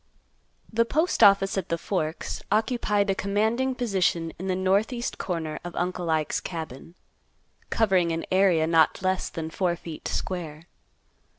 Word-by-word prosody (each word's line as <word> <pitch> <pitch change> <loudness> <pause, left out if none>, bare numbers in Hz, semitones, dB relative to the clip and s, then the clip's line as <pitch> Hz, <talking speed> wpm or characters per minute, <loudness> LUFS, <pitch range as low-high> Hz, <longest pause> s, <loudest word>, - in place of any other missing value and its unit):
The 230 +1 +4
Postoffice 200 - +4
at 185 - -7
the 170 - 0
Forks 165 -3 -3
occupied 210 -2 +1
a - - +2
commanding 220 +7 0
position 185 -8 0
in 190 - -4
the 185 - +1
northeast 200 +6 0
corner 160 -4 -3
of 175 -1 -7
Uncle 180 -1 -2
Ike's 155 -2 +1
cabin, 160 -2 -7 0.7
covering 190 -6 +2
an 165 0 -2
area 185 -4 +4
not 165 +2 +3
less 185 0 0
than 160 -1 -5
four 175 0 0
feet 165 -2 -8
square. 165 -4 -4
185 Hz, 135 wpm, -26 LUFS, 165-205 Hz, 0.7 s, The